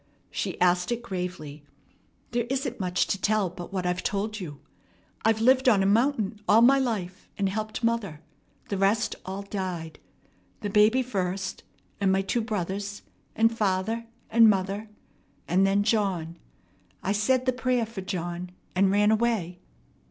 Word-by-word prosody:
She - - -3
asked 180 +3 +3
it 240 0 -2
gravely. 180 -8 -5 0.7
"There 240 0 0
isn't 265 -2 -2
much 180 -1 +1
to 195 - -2
tell 210 -4 +1
but 175 -1 -9
what 185 -2 -2
I've 180 0 0
told 210 +1 -2
you. 150 -7 -7 0.6
I've 220 0 +3
lived 260 +2 +5
on 200 -5 +4
a - - +1
mountain 220 -1 +1
all 225 +2 +6
my 270 +3 +6
life, 205 -8 -3
and 200 - +1
helped 215 +4 -4
mother. 230 -9 0 0.5
The 200 - -2
rest 205 +3 +2
all 195 +1 -4
died. 185 -5 -5 0.6
The 205 - -3
baby 215 +5 +4
first, 190 -5 -3 0.4
and 195 -2 +2
my 190 0 +2
two 235 +5 0
brothers, 200 -2 -3 0.3
and 225 +1 +3
father, 220 +2 0 0.2
and 225 0 +7
mother, 200 +2 -1 0.6
and 190 +3 +3
then 200 +1 +2
John. 190 -7 0 0.6
I 195 - 0
said 245 +5 +2
the 255 - +2
prayer 250 -1 0
for 220 -3 -7
John, 180 -2 -4 0.3
and 190 +1 +4
ran 205 +2 +4
away." 220 -6 0
200 Hz, 155 wpm, -27 LUFS, 185-225 Hz, 0.7 s, and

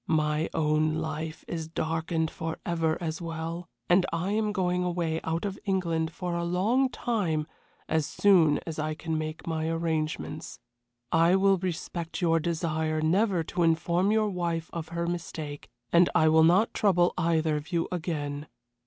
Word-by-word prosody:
My 155 0 +1
own 155 0 +2
life 160 0 -4
is 160 -2 -4
darkened 160 0 -1
forever 165 0 -2
as 165 -1 -4
well, 165 +1 -5 0.2
and 180 +1 +5
I 170 +4 -1
am 215 0 +1
going 180 -3 0
away 170 -2 -1
out 165 +4 -2
of 195 -1 -4
England 170 -5 0
for 175 +1 -4
a 170 - -1
long 210 +10 +2
time 190 -12 -1 0.4
as 160 -2 +1
soon 170 -7 +4
as 160 -2 -5
I 155 0 -1
can 160 0 -3
make 155 0 -4
my 160 -1 -1
arrangements. 160 -1 -2 0.5
I 165 +3 +5
will 195 -1 +4
respect 170 -2 -4
your 165 -2 +3
desire 160 -1 -1
never 180 +3 +2
to 175 - -3
inform 170 +3 +2
your 215 -1 +2
wife 170 -3 -2
of 165 -2 -5
her 170 0 -2
mistake, 160 -4 -5 0.2
and 170 +1 +6
I 155 0 +5
will 160 0 +6
not 180 +7 +4
trouble 180 -4 +3
either 165 -3 +1
of 150 +3 -5
you 170 -1 0
again. 150 -4 -3
165 Hz, 160 wpm, -28 LUFS, 160-180 Hz, 0.5 s, and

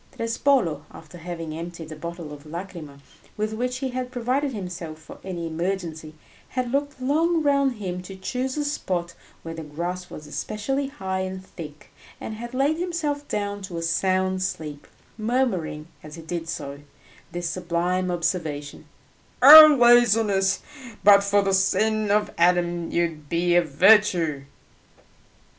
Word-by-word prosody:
Trespolo, 230 - +1
after 165 +2 -13
having 165 -2 -6
emptied 165 0 -7
a - - -6
bottle 170 -2 -7
of 145 +1 -12
lacryma 165 -4 -8 0.4
with 215 +1 -2
which 250 +3 -2
he - - -1
had 255 0 -4
provided 255 +3 -1
himself 180 -7 -6
for 160 - -13
any 175 -3 -5
emergency, 165 -2 -4 0.3
had 255 -2 -3
looked 285 0 -2
long 320 +5 +1
around 280 -2 +3
him 185 -5 -5
to 190 +1 -10
choose 255 +8 -3
a 295 - -1
spot 180 - -3 0.3
where 165 - -6
the 165 - -7
grass 175 +4 -5
was 150 - -9
especially 240 - -3
high 190 -9 -4
and 190 0 -5
thick, 150 -5 -11 0.3
and 220 - -6
had 240 +3 -7
laid 285 +4 +1
himself 310 -5 -2
down 205 -1 -3
to 190 -3 -7
a 165 - -3
sound 185 +2 0
sleep, 155 -5 -5 0.3
murmuring 215 -10 -1
as 150 +1 -10
he 165 - -10
did 165 0 -5
so, 140 -3 -5 0.5
this 175 0 -3
sublime 180 +1 -1
observation, 165 -4 -3 0.6
"O 305 +1 +11
laziness, 225 -5 +4 0.4
but 200 0 +7
for 200 0 +2
the 195 0 0
sin 215 +2 +2
of 210 +1 +1
Adam 175 -1 +2
you 170 - +1
would 155 -3 -5
be 175 +1 +1
a 175 - +6
virtue!" 170 -3 +3
185 Hz, 150 wpm, -24 LUFS, 165-235 Hz, 0.6 s, O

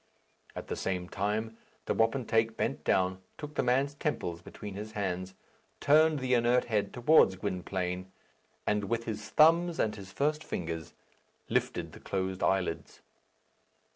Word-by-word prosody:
At - - -5
the - - -4
same 90 -2 -2
time, 110 +4 -2 0.3
the - - 0
wapentake 115 -1 +1
bent - - -1
down, 95 0 +1 0.2
took 150 -1 -7
the - - +1
man's 135 +3 +2
temples 90 - -3
between 105 +3 -8
his 105 +2 -7
hands, 95 -2 -3 0.4
turned 155 +1 +5
the 130 -1 0
inert 120 +1 +3
head 105 -3 0
towards 125 -6 +5
Gwynplaine, 95 -1 -3 0.5
and 105 -1 +1
with 115 +2 -1
his 110 -2 -5
thumbs 165 +6 +5
and 110 - +1
his 95 -2 -10
first 150 +8 0
fingers 80 -2 -5 0.5
lifted - - -1
the - - -12
closed 95 -1 -3
eyelids. 95 -3 -1
105 Hz, 140 wpm, -30 LUFS, 95-125 Hz, 0.5 s, turned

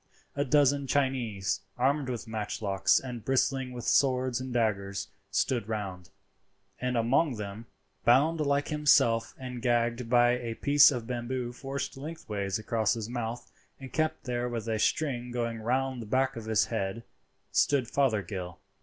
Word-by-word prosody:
A 140 - +1
dozen 140 0 +3
Chinese, 125 -8 0 0.2
armed 135 +2 +1
with 120 -2 -4
matchlocks 100 -3 +1
and 125 -4 -7
bristling 135 0 +1
with 120 -1 -7
swords 130 -2 +2
and 130 0 -5
daggers, 100 -5 -1 0.2
stood 115 +1 0
around; 95 -5 -4 0.7
and 125 -1 -1
among 125 +5 +2
them, 105 +2 -7 0.4
bound 145 +7 +4
like 145 -1 +1
himself 120 -7 +3
and 125 -2 -7
gagged 120 -1 0
by 120 0 +5
a 120 -2 -2
piece 145 +2 +6
of 125 -5 -3
bamboo 120 0 -3
forced 135 +1 -5
lengthways 110 - -4
across 110 0 0
his 115 -1 -5
mouth 120 -1 -4 0.3
and 135 -1 -10
kept 155 0 0
there 125 0 -2
with 115 -2 -4
a 110 -1 -1
string 125 -1 0
going 115 -2 -2
round 130 +2 -1
the 110 - -8
back 130 +4 +1
of 115 -2 -7
the 110 -1 +2
head, 110 +1 -2 0.5
stood 135 -4 +2
Fothergill. 100 -10 -1
120 Hz, 150 wpm, -29 LUFS, 110-135 Hz, 0.7 s, piece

